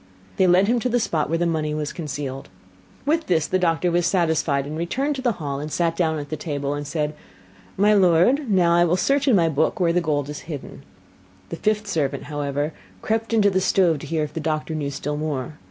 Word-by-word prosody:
They 190 -2 +4
led 180 +3 +4
him 240 +2 +2
to 250 - -1
the 245 0 +2
spot 160 -10 -1
where 165 - +1
the 175 - 0
money 155 -2 -1
was 150 -1 -3
concealed. 140 - -5 0.6
With 320 +3 +1
this 160 -4 +2
the 185 - 0
doctor 175 0 +1
was 175 0 +2
satisfied, 160 -6 +1
and 150 +2 -5
returned 265 - -1
to - - -4
the 245 -3 +1
hall, 145 -4 -4
sat 165 +1 0
down 160 -2 0
to 145 -1 -5
the 155 - -4
table, 145 -2 -3
and 145 0 -5
said: 150 0 -2 0.6
'My 205 +2 +4
lord, 200 - +4
now 175 -3 +4
will 175 0 +2
I - - +3
search 280 +7 +1
in 255 - +5
my 170 -3 +4
book 160 +6 0
where 170 -2 +2
the 180 - +2
gold 145 -4 -1
is 150 0 -6
hidden.' 145 -4 -7 0.7
The - - -4
fifth 215 +2 0
servant, 155 -9 -1
however, 145 +1 -3 0.3
crept 225 +1 -1
into 210 -3 +4
the 190 0 +1
stove 175 -5 +2
to 150 - -9
hear 160 0 0
if 150 - -5
the - - -3
doctor 155 0 -2
knew 150 -2 -2
still 145 +1 -4
more. 150 -2 -4
165 Hz, 225 wpm, -23 LUFS, 150-190 Hz, 0.7 s, in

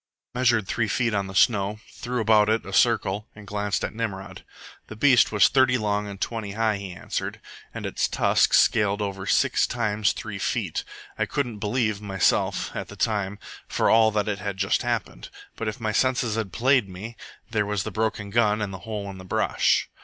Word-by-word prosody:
I 125 - -5
measured 120 -5 +3
three 115 -2 0
feet 115 +2 0
on 100 -1 -1
the 95 - -9
snow, 105 0 +2
threw 125 -1 -3
about 105 -1 +4
it 110 +1 +1
a 100 - -8
circle, 105 -2 +2
and 105 -1 -12
glanced 105 0 -2
at - - -3
Nimrod. 105 -4 -5 0.4
"The 110 - -9
beast 125 +2 +4
was 105 -2 +5
thirty 130 -2 +3
long 105 -2 -1
and 100 -1 -8
twenty 110 -3 -3
high," 110 -1 +1
he 100 -2 -7
answered, 90 - -5 0.3
"and - - -6
its - - 0
tusks - - +3
scaled 105 0 +2
over 95 -1 -5
six - - +2
times 105 -4 0
three - - -6
feet. - - -2 0.4
I - - +1
couldn't 120 -7 -3
believe, 110 -1 -1
myself, 95 -2 0
at - - -4
the - - -11
time, 105 -2 -1 0.3
for - - +1
all 110 0 +6
that 105 -1 -1
it 105 -1 -2
had 100 -1 -4
just 95 0 +1
happened. - - -3 0.3
But 115 - -4
if 110 - -4
my 110 -2 -1
senses 125 -1 +1
had 110 -4 -3
played 130 -4 +2
me, 105 +6 -8 0.4
there 105 -2 0
was 105 -2 -1
the 110 - -5
broken 110 -1 -2
gun 105 -1 +2
and 105 -2 -3
the 95 - -7
hole 105 -2 -4
in 95 - -10
the - - -9
brush. 90 - +1
105 Hz, 200 wpm, -25 LUFS, 100-115 Hz, 0.4 s, all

